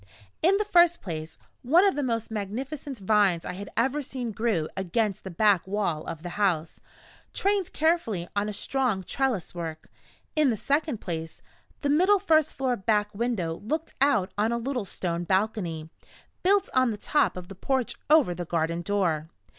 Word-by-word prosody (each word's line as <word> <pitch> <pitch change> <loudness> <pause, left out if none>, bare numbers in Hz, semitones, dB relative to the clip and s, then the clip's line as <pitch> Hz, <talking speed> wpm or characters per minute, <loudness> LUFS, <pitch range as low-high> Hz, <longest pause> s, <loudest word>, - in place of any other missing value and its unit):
In 370 +5 +4
the 420 - 0
first 345 -3 +5
place, 160 -4 -6 0.2
one 330 +10 +5
of 390 - +3
the 290 - -2
most 230 -4 -2
magnificent 255 +7 -4
vines 195 -4 +2
I - - -4
had 200 +2 -7
ever 265 +5 +1
seen 250 -4 -4
grew 210 -7 0
against 195 +2 -1
the 190 - -6
back 195 0 +3
wall 190 -6 -1
of 160 -1 -6
the 175 - -4
house, 165 -5 0 0.5
trained 395 -2 +1
carefully 300 - +1
on 205 +1 0
a - - -2
strong 235 -2 -1
trellis 245 -3 -1
work. 165 -2 -6 0.4
In 305 -3 +4
the 225 - 0
second 285 -1 0
place, 165 -2 -5 0.4
the 285 - 0
middle 370 +7 +5
first 320 -6 +2
floor 260 -2 0
back 210 0 0
window 200 -7 -1
looked 310 +8 -3
out 225 -9 +3
on 220 +2 +2
a 235 - 0
little 250 -2 -2
stone 175 -2 -3
balcony, 180 -5 -1 0.5
built 395 +2 +3
on 255 -1 +4
the 215 - -3
top 295 0 +1
of 180 -1 -7
the 195 - -9
porch 245 +4 -1 0.2
over 300 - +5
the 175 +1 -4
garden 170 0 -1
door. 170 -5 0
215 Hz, 175 wpm, -27 LUFS, 180-275 Hz, 0.5 s, first